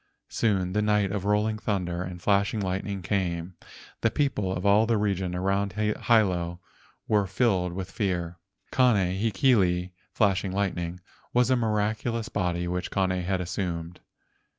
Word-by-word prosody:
Soon 95 -5 0
the 105 - +2
night 105 -2 +2
of 100 -2 -3
rolling 105 +1 +1
thunder 90 -5 -2
and 90 -1 -6
flashing 100 +3 +1
lightning 95 0 -3
came. 85 -1 -1 0.5
The 115 - +3
people 115 -7 0
of 95 +1 -3
all 105 +2 +5
the 115 -2 +2
region 95 -3 -1
around 95 +1 0
Hilo 105 -5 +1 0.5
were 105 -2 +2
filled 95 -4 +1
with 95 0 -5
fear. 90 -4 -2 0.3
Kane 100 -7 +2
hekili 95 -6 +2 0.2
(flashing 95 -2 +1
lightning) 90 -3 -2 0.3
was 125 +1 +4
a - - +5
miraculous 110 0 -1
body 90 -3 -1
which 90 +1 -2
Kane 95 -2 +1
had 90 0 -1
assumed. 90 -2 -4
95 Hz, 140 wpm, -27 LUFS, 90-105 Hz, 0.5 s, all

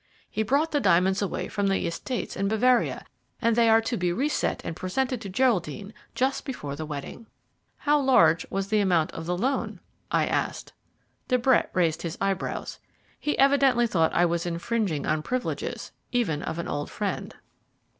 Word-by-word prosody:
He - - -1
brought 280 +9 +1
the 290 - +2
diamonds 190 -2 +3
away 200 - -2
from 205 -1 -1
the 195 0 +1
estates 240 +9 -4
in 195 +1 -1
Bavaria, 240 +4 +2 0.3
and 230 -2 +2
they 230 -1 +4
are 225 0 +6
to 225 +2 -2
be 180 -1 0
reset 275 +12 0
and 165 - -4
presented 245 +7 -2
to 200 - -6
Geraldine 200 - 0 0.2
just 265 +2 0
before 145 - -5
the 155 +1 -6
wedding." 150 +9 -7 0.5
"How 295 0 +2
large 170 - +4
was 195 0 -2
the 215 0 +3
amount 175 -6 +2
of 165 0 -7
the 180 0 -1
loan?" 265 +8 -1 0.3
I - - +2
asked. - - -2 0.5
De 255 - +3
Brett 250 0 +3
raised 165 -3 +1
his 170 -1 -5
eyebrows. 195 -2 -2 0.4
He 295 - -1
evidently 275 -3 +4
thought 165 -8 +2
that - - -3
I 175 - +5
was 170 0 -1
infringing 170 -2 -1
on 155 - +1
the - - -5
privileges 250 +9 -3 0.2
even 205 -12 0
of 160 - -4
an 170 - -4
old 145 0 -3
friend. - - -4
200 Hz, 180 wpm, -26 LUFS, 170-250 Hz, 0.5 s, are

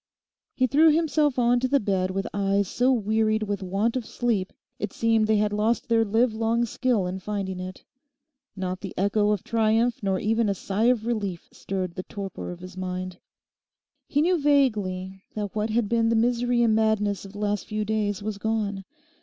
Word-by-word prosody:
He 255 - +3
threw 295 +6 +5
himself 305 -3 +2
on 245 0 +3
to 255 - 0
the 280 +2 +3
bed 190 -4 0
with 195 +1 -2
eyes 200 0 +1
so 250 +7 +2
wearied 220 -1 +1
with 205 -2 -3
want 195 +6 0
of 255 - -1
sleep 220 -5 -1 0.3
it 210 - -4
seemed 225 -1 +2
they 220 -1 +3
had 210 0 +1
lost 215 +3 0
their 225 -1 +4
livelong 225 +1 +1
skill 235 -3 0
in 185 +1 -4
finding 190 -1 -4
it. 185 0 -7 0.7
Not 185 -1 -4
the 195 - -7
echo 205 +2 +2
of 210 -3 0
triumph 230 +3 +1
nor 195 -2 0
even 225 +1 +1
a 200 - 0
sigh 200 +4 -1
of 240 -3 +3
relief 205 -7 -3
stirred 185 -3 -4
the 185 - -4
torpor 195 0 -7
of 175 0 -8
his 185 0 -10
mind. 185 -1 -5 0.9
He 290 +1 +2
knew 355 0 +2
vaguely 205 -10 +1
that 205 -2 -3
what 215 +1 0
had 220 0 +1
been 230 +1 +2
the 230 - +2
misery 240 +1 +2
and 225 -2 +3
madness 215 -3 +1
of 195 0 -11
the 205 - -8
last 205 -1 -1
few 215 0 -2
days 210 -1 -1
was 210 -1 -4
gone. 205 -3 -2
215 Hz, 190 wpm, -25 LUFS, 195-235 Hz, 0.9 s, threw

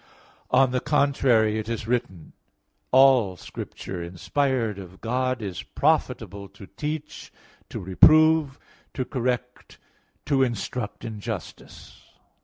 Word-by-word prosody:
On 135 -1 +4
the 125 - 0
contrary, 130 -7 +2
It 110 +1 -6
is 115 -2 -3
written 120 0 0
(2 90 -3 -14
Tim. - - -18
3:16): - - -36 0.6
"All 130 -8 +5
Scripture 90 0 -7
inspired 110 +5 -1
of 95 0 -11
God 125 +1 -1
is 95 -4 -5
profitable 100 0 -1
to 100 - -13
teach, 150 +8 -6 0.4
to - - -6
reprove, 155 - +5 0.4
to 130 - -2
correct, 125 -1 -3 0.5
to 140 -2 +2
instruct 120 -2 -3
in 110 -2 -6
justice." 100 - -8
120 Hz, 125 wpm, -25 LUFS, 100-135 Hz, 0.6 s, All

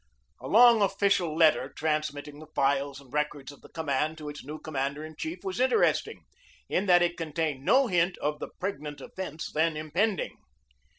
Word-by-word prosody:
A - - -7
long 235 0 +7
official 195 -5 +1
letter 160 -2 +4
transmitting 150 -1 -2
the 155 - -11
files 140 0 +1
and 135 -2 -18
records 150 -2 -2
of 145 - -16
the - - -15
command 155 0 -1
to 150 -1 -7
its 145 - -8
new 150 +3 -7
commander 140 0 -3
in 155 0 -11
chief 170 +5 -6
was 190 +3 -4
interesting, 260 - +2 0.4
in 195 - 0
that 175 -1 +6
it 175 0 0
contained 155 -3 -2
no 270 - +4
hint 180 -4 +1
of 150 0 -2
the - - -5
pregnant 150 -7 -4
events 175 -5 -6
then 160 0 +1
impending. 175 +6 -1
155 Hz, 175 wpm, -28 LUFS, 145-185 Hz, 0.4 s, long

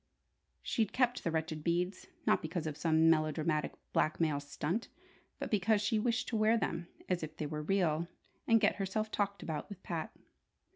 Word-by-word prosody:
She'd 220 -3 0
kept 250 -1 +2
the - - +1
wretched 160 -1 -2
beads, 180 +3 0 0.2
not - - +4
because 165 +1 -3
of 155 -2 -3
some 160 +1 +3
melodramatic 155 -1 +2 0.2
blackmail 155 -2 +2
"stunt," 150 +9 -2 0.5
but - - -5
because 210 +1 +3
she 210 +1 +1
wished 245 +2 0
to 235 - -2
wear 220 +1 +4
them 170 -5 -2 0.2
as 180 -1 0
if 155 0 -6
they 155 - -2
were 150 +1 -3
real, 170 -1 +1 0.4
and 230 -1 +6
get 210 - +3
herself 210 +2 -1
talked 200 -2 -1
about 160 +2 -4
with 200 -2 -10
Pat. 165 -2 -3
170 Hz, 175 wpm, -34 LUFS, 155-210 Hz, 0.5 s, and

